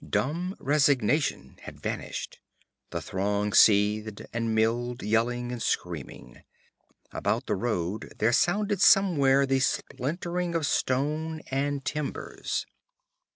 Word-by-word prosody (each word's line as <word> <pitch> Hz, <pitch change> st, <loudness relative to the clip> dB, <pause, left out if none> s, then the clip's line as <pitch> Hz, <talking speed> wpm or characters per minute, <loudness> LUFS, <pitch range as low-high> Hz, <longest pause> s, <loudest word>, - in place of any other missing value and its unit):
Dumb 170 Hz, +7 st, -2 dB
resignation 145 Hz, -1 st, +1 dB
had -, -, -10 dB
vanished. -, -, -5 dB, 0.5 s
The -, -, -4 dB
throng 100 Hz, +2 st, -1 dB
seethed 105 Hz, 0 st, +4 dB
and 115 Hz, -1 st, -1 dB
milled, 120 Hz, +2 st, 0 dB
yelling 120 Hz, +3 st, 0 dB
and 120 Hz, -2 st, -5 dB
screaming. 75 Hz, -, -4 dB, 0.7 s
About -, -, -1 dB
the -, -, -1 dB
road 100 Hz, -2 st, -2 dB
there 115 Hz, +3 st, +2 dB
sounded 200 Hz, -, +1 dB
somewhere 140 Hz, -10 st, +5 dB
the 135 Hz, 0 st, +1 dB
splintering 170 Hz, +7 st, -2 dB
of 165 Hz, -3 st, +1 dB
stone 155 Hz, +5 st, -1 dB
and 140 Hz, 0 st, -1 dB
timbers. 150 Hz, -2 st, -3 dB
130 Hz, 110 wpm, -27 LUFS, 110-155 Hz, 0.7 s, somewhere